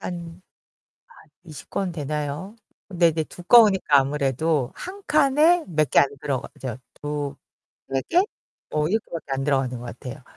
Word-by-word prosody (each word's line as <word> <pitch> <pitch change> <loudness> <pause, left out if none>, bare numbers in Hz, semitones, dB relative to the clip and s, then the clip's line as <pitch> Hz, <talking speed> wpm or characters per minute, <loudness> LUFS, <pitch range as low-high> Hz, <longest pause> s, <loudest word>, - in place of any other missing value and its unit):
한 170 0 -7 1.0
20 155 -5 -11
권 190 -2 -2
되나요? 150 +4 -4 0.3
근데 175 -3 +3
이제 160 0 -1
두꺼우니까 190 - +5
아무래도 140 0 0
한 390 +2 -8
칸에 305 +4 +4
몇 155 -5 +1
개 - - +6
안 140 - +5
들어가죠. 130 -3 -4 0.2
2-3 145 -1 -6 0.5
개? 355 +2 +5 0.5
뭐 150 0 0
이렇게밖에 175 -8 -3
안 135 0 -1
들어가는 135 -3 0
것 120 - -9
같아요. 125 +4 -8
155 Hz, 255 characters per minute, -24 LUFS, 140-190 Hz, 1.0 s, 개